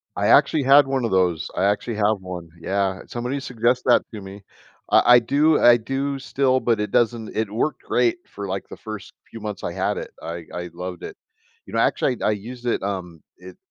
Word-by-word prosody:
I - - 0
actually 150 -3 +4
had 140 +1 +6
one 135 -3 0
of - - -2
those, 90 -4 +1
I 95 - +1
actually 105 +3 0
have 105 -1 +1
one, 90 -3 -7
yeah, 95 +1 -1
somebody 125 +4 -3
suggested 125 0 0
that 120 - +5
to 105 - -7
me. 95 +1 -10 0.5
I 120 - +6
I - - +8
do 150 +6 +2
I 120 0 +7
do 135 +4 -3
still, 130 -1 +1
but 115 -4 +1
it 105 -1 -2
doesn't 115 -2 0
it 110 -2 -1
worked 125 +8 -2
great 125 +7 +1
for 100 0 -7
like 95 0 -4
the - - -9
1st 110 -2 -8 0.2
few 115 - -9
months 105 -1 -6
I - - -3
had - - -1
it, - - -6
I 85 0 -6
I 90 0 -5
loved 90 0 -7
it, - - -8 0.5
you - - -13
know, - - +1
actually, 125 - +1
I - - +2
I - - +3
used 120 +4 -7
it, 120 - 0
um, 90 -5 -5 0.2
it 90 0 -13
110 Hz, 220 wpm, -22 LUFS, 95-125 Hz, 0.5 s, I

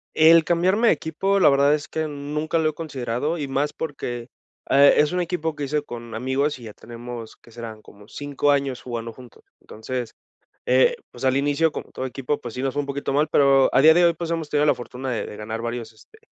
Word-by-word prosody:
El 160 +1 +7
cambiarme 185 +7 +2
de - - +6
equipo, 195 +5 -1
la 185 - +6
verdad 140 +1 +4
es 150 - -6
que 160 0 -3
nunca 150 +2 -3
lo 160 -1 +2
he - - -6
considerado, 145 0 -3
y 145 -3 -3
más 140 +2 -1
porque, 125 -6 -5 0.4
eh, 140 +1 +7
es 150 0 +3
un 180 0 0
equipo 165 -3 -2
que 145 -1 -3
hice 150 +2 -1
con 120 -4 -8
amigos 130 +5 -1
y - - -13
ya 110 -2 -9
tenemos, 120 0 -9
¿qué 115 - -20
serán? 115 -2 -8
como 105 -1 -17
5 145 +2 -1
años 140 -3 0
jugando 115 -2 -5
juntos, 125 -2 -15 0.2
entonces, 120 +2 -6 0.5
eh, 485 0 +4
pues, - - -9
al 130 0 +3
inicio 145 +3 +1
como - - -7
todo 130 - -5
equipo 130 +3 -3
pues 120 - -7
sí 125 - -4
nos 135 -1 -1
fue 145 - 0
un - - -8
poquito 140 0 -3
mal 150 +2 +2
pero 135 -1 +4
al 135 - +4
día 160 +2 +8
de 175 +1 +4
hoy 170 - +5
pues 165 0 -6
hemos 165 -3 -3
tenido 150 0 +2
la - - +4
fortuna 125 +2 -6
de 115 - -2
de - - -8
ganar 110 +2 -5
varios, 115 -1 -5
este, 435 - -21
140 Hz, 230 wpm, -23 LUFS, 120-155 Hz, 0.5 s, día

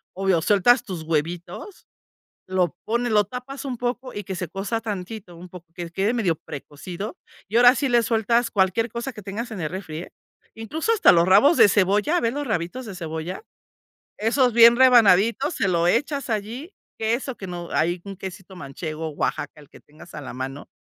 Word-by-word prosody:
obvio, 190 -3 +1
sueltas 210 +7 +4
tus 180 -5 -6
huevitos, 170 - -4 0.6
lo 180 -3 0
pones, 235 +1 0
lo 210 -1 +4
tapas 250 +6 -8
un 260 -3 -4
poco 250 +2 -3
y 205 - -5
que 190 - -5
se 180 -2 -4
cueza 200 +5 -3
tantito, 200 -3 -6
un 180 +2 -11
poco, 175 -1 -12
que 175 -1 -6
quede 195 +6 0
medio 195 -9 +1
precocido. 170 - -8 0.3
Y 220 - -2
ahora 245 +1 +7
sí 275 - -1
le 240 -1 +3
sueltas 230 +1 +1
cualquier 195 +3 +1
cosa 235 +4 -5
que 210 - -11
tengas 210 +5 -5
en 200 - -6
el 155 - -2
refri, 180 -5 -6
eh. 175 - -8 0.4
Incluso 300 - -2
hasta 440 - +6
los 170 0 +4
rabos 245 - +6
de - - +7
cebolla, 205 - +2
a - - +2
ver 230 0 0
los 290 -1 -3
rabitos 210 +5 -3
de 200 - -7
cebolla, 160 - -5 0.8
esos 245 +3 +2
bien 235 +1 +8
rebanaditos, 235 - +5
se 200 - 0
lo 170 -2 +2
echas 280 - 0
allí, 230 - -4 0.3
queso 235 +3 -1
que 190 - -8
no 175 -1 -6
ahí 175 +2 0
un 200 -1 -7
quesito 190 0 -9
manchego, 155 +1 -6
Oaxaca, 145 0 -3
el 145 - -18
que - - -16
tengas 155 +3 -17
a 150 - -6
la 130 - -8
mano, 135 +2 -6
200 Hz, 195 wpm, -23 LUFS, 175-240 Hz, 0.8 s, bien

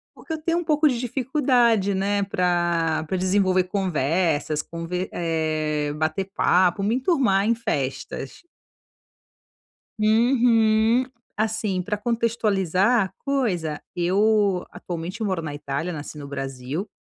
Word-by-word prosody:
Porque 320 - -7
eu - - -2
tenho 335 +2 0
um 345 - -1
pouco 305 -1 +3
de 240 -2 -1
dificuldade, 245 -5 +2
né, 200 +1 0
pra 175 -4 0
pra 190 - -1
desenvolver 185 0 +2
conversas, 165 -4 0
conver 170 +2 -4
eh, 155 -3 -1
bater 155 +5 -1
papo, 180 0 +3
me 220 +4 +1
enturmar, 250 - +2
em 230 - +2
festas. 140 - -4 1.6
Uhum. 225 +1 +3 0.3
Assim, 215 -3 -1
pra 210 +3 -2
contextualizar 215 -2 +1
a - - -13
coisa, 185 - -1 0.2
eu 195 +1 +2
atualmente 175 +5 -6
moro 190 -5 -1
na 150 -2 -5
Itália, 145 +4 -3
nasci 150 -1 -7
no 140 -1 -8
Brasil. 135 +6 -5
190 Hz, 120 wpm, -24 LUFS, 165-225 Hz, 1.6 s, pouco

